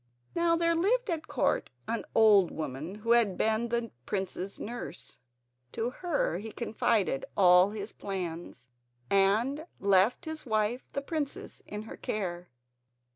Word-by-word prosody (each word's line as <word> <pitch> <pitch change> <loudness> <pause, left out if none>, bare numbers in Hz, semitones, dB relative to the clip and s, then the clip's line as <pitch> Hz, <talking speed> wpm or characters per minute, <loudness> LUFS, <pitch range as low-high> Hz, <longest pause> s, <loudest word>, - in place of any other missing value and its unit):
Now 335 0 +3
there 335 0 +2
lived 420 +7 +1
at 320 -2 -3
Court - - 0 0.2
an 230 - -2
old 210 -5 +6
woman 155 +4 -5
who 230 - +2
had 230 -6 +4
been 220 +2 +1
the 235 -1 -2 0.2
prince's 190 0 -3
nurse. 210 - -7 0.5
To 235 +2 -1
her 290 - -1
he 220 +2 -7
confided 215 - 0
all 180 0 +7
his 210 0 -6
plans, 170 -9 -6 0.4
and 225 - +2
left 200 - +3
his 315 -1 -5
wife, 220 +2 -1
the 280 - -2
princess, 295 -2 -4
in 210 +1 -5
her 220 - -9
care. 180 -4 -3
215 Hz, 135 wpm, -30 LUFS, 190-260 Hz, 0.5 s, all